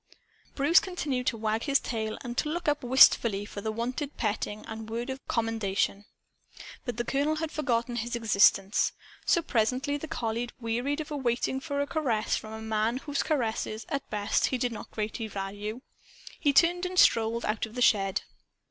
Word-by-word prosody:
Bruce 295 +5 +5
continued 290 -9 -3
to 230 - +1
wag 220 0 -1
his 280 -1 +3
tail 220 -2 -3
and 240 -1 -5
to 300 - 0
look 345 +2 -3
up 295 -2 +1
wistfully 235 -5 +5
for 205 - -7
the 220 +1 -2
wonted 250 +6 -4
petting 210 -1 -2
and 220 0 -7
word 235 +4 -3
of 265 - -5
commendation. 210 -3 -1 0.8
But 245 -4 -4
the 240 - 0
colonel 285 +5 0
had 315 0 -3
forgotten 240 -4 -1
his 235 +1 -2
existence. 200 -2 +3 0.3
So 340 - +3
presently 255 +3 0
the 315 - -7
collie 235 -2 -2
wearied 245 +6 -1
of 310 +1 -8
waiting 265 -2 0
for 285 0 -2
a - - +1
caress 255 -9 0
from 215 0 -6
a 220 0 -7
man 220 +2 0
whose 285 +1 -2
caresses, 225 -5 -1
at 280 -1 -3
best, 205 -1 +1
he 260 - -1
did 245 0 -1
not 220 - -8
greatly 220 +1 -3
value. 205 +3 -5 0.6
He 290 - +3
turned 340 +5 +4
and 365 0 -6
strolled 230 -5 +4
out 215 +1 -1
of 220 - -14
the 250 - -3
shed. 195 -4 +3
235 Hz, 180 wpm, -28 LUFS, 220-280 Hz, 0.8 s, Bruce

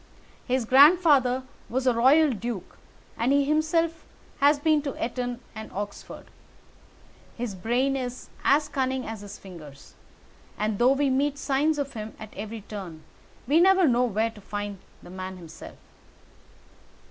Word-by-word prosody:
His 255 -2 0
grandfather 275 -2 +5 0.3
was 260 +2 -1
a 250 - +4
royal 275 +6 +5
duke, 220 -4 -5 0.4
and 235 +3 +2
he 280 0 +3
himself 320 +2 0 0.4
has 285 +1 +5
been 305 +1 +2
to 280 -2 -4
Eton 245 +1 -3
and 220 -1 -8
Oxford. 205 +1 -7 1.1
His 240 -4 -3
brain 245 +8 0
is 250 -1 -5 0.2
as 295 +1 +3
cunning 265 -2 -2
as 220 -2 -6
his 205 -1 -9
fingers, 155 -7 -13 0.6
and 215 -1 -1
though 250 +3 +5
we 275 0 +1
meet 280 +2 +1
signs 295 +2 +1
of 280 -1 -3
him 215 -1 -7
at 215 -1 -10
every 215 +2 -6
turn, 190 -6 -8 0.4
we 300 +5 +4
never 380 -1 +5
know 250 -1 +3
where 225 0 0
to 215 -2 -15
find 205 0 -5 0.2
the - - -12
man 185 0 -6
himself. 165 -3 -11
250 Hz, 145 wpm, -26 LUFS, 210-285 Hz, 1.1 s, grandfather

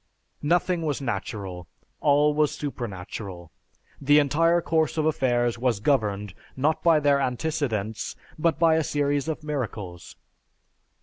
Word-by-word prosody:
"Nothing 175 +2 +1
was 150 -4 -1
natural, 100 -7 -4 0.3
all 145 +1 +4
was 150 0 +2
supernatural. 95 - -6 0.5
The 145 +2 +5
entire 165 +4 +3
course 160 -2 0
of 155 - +1
affairs 120 -6 +1
was 120 -4 +1
governed, 105 -5 0 0.2
not 150 +4 +1
by 165 -2 +5
their 145 -1 +3
antecedents, 125 -6 -2 0.2
but 165 +1 +2
by 165 -1 +4
a 160 - +1
series 145 0 0
of 160 -1 -3
miracles. 105 - -5
140 Hz, 125 wpm, -25 LUFS, 110-155 Hz, 0.5 s, The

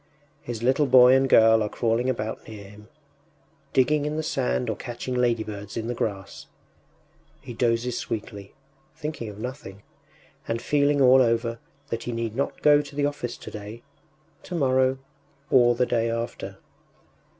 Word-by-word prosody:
His 120 -4 -6
little 135 +4 +2
boy 125 0 +7
and 135 0 +3
girl 110 -1 +6
are 105 - -1
crawling 115 +3 0
about 110 -3 -4
near 105 -2 -9
him, 105 +1 -15 0.8
digging 145 +3 +2
in 150 +1 -3
the 155 - -2
sand 60 - -1
or - - -1
catching 120 +1 -6
ladybirds 110 -4 -2
in 115 - -3
the 120 - -2
grass. 100 -4 -5 0.9
He 130 -3 -9
dozes 120 +1 0
sweetly, 105 -3 -6 0.4
thinking 150 -8 -5
of 100 - -10
nothing, 110 -4 -8 0.6
and 115 0 -1
feeling 145 +2 +1
all 130 0 +7
over 115 -1 0 0.3
that 115 0 -4
he 120 - -3
need 115 -1 -3
not 140 - -3
go 145 -1 +6
to 145 -1 -12
the 145 0 +1
office 145 -5 -4
today, 105 +3 -9 0.6
tomorrow, 130 -5 +1 0.5
or 120 -2 +5
the 125 - +2
day 115 -1 0
after. 115 +1 -5
120 Hz, 150 wpm, -25 LUFS, 110-130 Hz, 0.9 s, boy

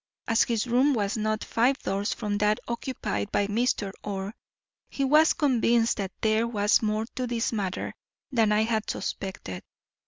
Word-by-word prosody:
As 225 -1 +3
his 230 -2 0
room 255 +4 +3
was 205 -2 0
not 215 0 -1
five 250 +4 +2
doors 200 -5 -2
from 205 -2 -2
that 210 +1 +2
occupied 235 - -3
by 205 - +2
Mr. 210 -1 0
Orr, 200 0 -4 0.6
he 275 - -2
was 305 +4 +5
convinced 240 -6 +2
that 195 -2 -3
there 220 +1 +2
was 210 -2 +2
more 215 0 0
to 255 -1 -2
this 235 -1 -1
matter 195 -4 -3 0.4
than 225 -4 +3
I 210 +1 +3
had 220 -1 -1
suspected. 140 - -4
220 Hz, 160 wpm, -27 LUFS, 205-240 Hz, 0.6 s, was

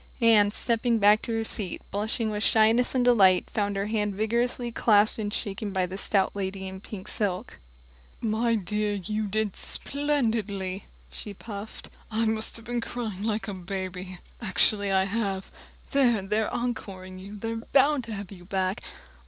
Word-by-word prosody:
Anne, 220 -4 +6
stepping 230 +2 0
back 210 0 +5
to - - -5
her 225 0 0
seat, 205 -4 -2
blushing 220 +2 -1
with 210 0 -2
shyness 225 +4 +4
and 250 -1 +3
delight, 195 -7 +5
found 205 -1 0
her 195 0 -1
hand 210 -2 -1
vigorously 235 +3 0
clasped 215 -1 +3
and 205 -1 -2
shaken 205 0 -3
by 190 -1 +1
the 185 +1 -6
stout 195 0 +1
lady 190 -1 -3
in 190 0 -7
pink 205 -1 -8
silk. 205 +1 -2 0.6
"My 230 +1 +1
dear, 210 +1 -1
you 210 +3 -2
did 210 0 -1
splendidly," 220 -10 -1 0.3
she 205 -1 -7
puffed. 205 +1 -8 0.2
"I've 220 0 0
been 240 +1 -2
crying 225 -5 -4
like 215 -2 -1
a 205 - -3
baby, 185 0 -5 0.2
actually 200 0 +2
I 190 0 +4
have. 195 -1 -2 0.4
There, 245 -7 +3
they're 210 +2 0
encoring 195 -6 -4
you 200 +2 -9
they're 225 +2 -3
bound 275 +4 +3
to 230 - -6
have 200 -1 -7
you 180 -3 -11
back!" 190 +1 -1
210 Hz, 160 wpm, -27 LUFS, 195-225 Hz, 0.6 s, Anne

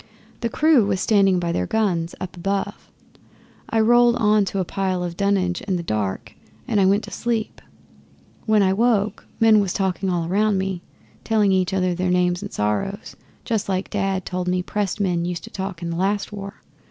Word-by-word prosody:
The 235 - -1
crew 290 -4 +4
was 190 -2 0
standing 195 -2 +3
by 170 -1 -1
their - - -1
guns 185 -7 0
up 185 -1 -6
above. 195 +3 -3 0.8
I 225 - +1
rolled 240 +2 +5
on 210 -3 +3
to 195 - -4
a 185 - 0
pile 185 -1 -2
of 175 -1 -4
dunnage 190 -2 0
in 195 -2 -2
the 175 - -3
dark 105 - -3 0.3
and 215 -3 +1
I 190 - +4
went 200 +2 +2
to - - -9
sleep. 230 -2 -3 0.9
When 215 -2 +4
I 190 0 +3
woke, 215 -1 +1
men 225 -1 +6
was 195 -3 0
talking 190 -1 -1
all 170 -2 -1
round 205 +2 +2
me, 190 -2 -2 0.4
telling 215 -3 +2
each 185 -1 +1
other 185 -1 +1
their 180 +1 -1
names 180 0 +1
and - - -6
sorrows 105 - -2 0.3
just 220 -4 -1
like 190 0 -2
Dad 195 -2 -1
told 180 -1 -3
me 180 0 0
pressed 205 +1 -2
men 180 -4 0
used 175 -1 -4
to - - -10
talk 190 -2 -5
in 170 - -3
the 165 - -3
last 200 +3 -1
war. 200 0 -8
195 Hz, 195 wpm, -22 LUFS, 180-210 Hz, 0.9 s, men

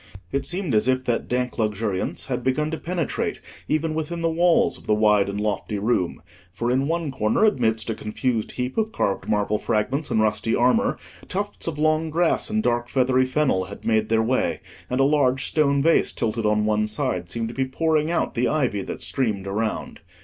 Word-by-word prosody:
It 140 0 -1
seemed 180 -5 -1
as 105 +2 +3
if 130 0 +2
that 120 -1 -1
dank 125 0 -2
luxuriance 105 -3 -1
had 125 -2 -3
begun 150 +5 0
to 160 - -2
penetrate 170 -4 -2 0.3
even 155 +1 0
within 160 +2 -3
the 165 - +2
walls 170 +1 +3
of - - -18
the 105 - +3
wide 105 -2 +3
and 100 +1 -3
lofty 105 0 -2
room; 100 -4 -1 0.3
for 120 +6 -2
in 135 +2 +1
one 165 -2 -1
corner, 110 - +2
amidst 115 - +1
a 115 - 0
confused 110 +1 -2
heap 125 - -2
of 220 0 0
carved 100 - -1
marble 105 0 +1
fragments 130 +7 -1
and - - +1
rusty 110 +1 +1
armour, 125 +1 +2 0.3
tufts 205 0 -3
of 160 -3 -3
long 155 +1 +1
grass 165 +2 +1
and 215 0 0
dark 120 0 0
feathery 130 0 +2
fennel 130 -8 +1
had 100 +2 -11
made 110 -1 +1
their 110 0 +3
way, 130 +3 0 0.3
and 125 - -1
a - - +5
large 135 -2 +2
stone 140 -3 +2
vase, 165 +1 +3
tilted 110 -1 -1
on 105 0 +2
one 105 0 +1
side, 90 -4 -2
seemed 115 +2 -2
to - - -7
be 135 +1 0
pouring 155 +3 0
out 170 - 0
the 125 +1 +1
ivy 130 -10 0
that - - -6
streamed 110 -8 -1
around. 105 +3 -3
125 Hz, 200 wpm, -23 LUFS, 110-150 Hz, 0.3 s, a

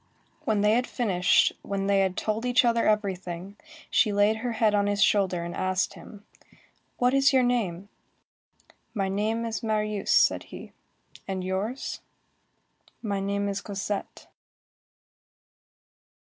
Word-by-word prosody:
When 215 -2 +1
they 210 +1 +4
had 245 +3 +2
finished, 190 -8 +2
when 195 -1 -3
they 200 0 +3
had 190 -1 0
told 220 +1 -1
each 250 0 +3
other 235 -1 +2
everything, 190 -3 -2 0.4
she 215 - +3
laid 205 +2 +3
her 235 +1 -3
head 220 -2 +2
on 205 -1 +2
his 205 -1 +2
shoulder 185 -4 +2
and 170 0 -5
asked 185 +1 0
him:— 205 -1 -13 0.7
"What 250 +1 +2
is 275 0 +4
your 260 -1 +4
name?" 200 -7 -1 1.1
"My 195 -2 0
name 215 +4 -1
is 225 -1 -3
Marius," 215 -2 -2
said - - +4
he. - - -10 0.6
"And 190 -1 -3
yours?" 195 +8 -3 1.0
"My 200 -3 -1
name 200 +1 -1
is 200 0 -3
Cosette." 200 0 -5
205 Hz, 135 wpm, -26 LUFS, 195-225 Hz, 1.1 s, they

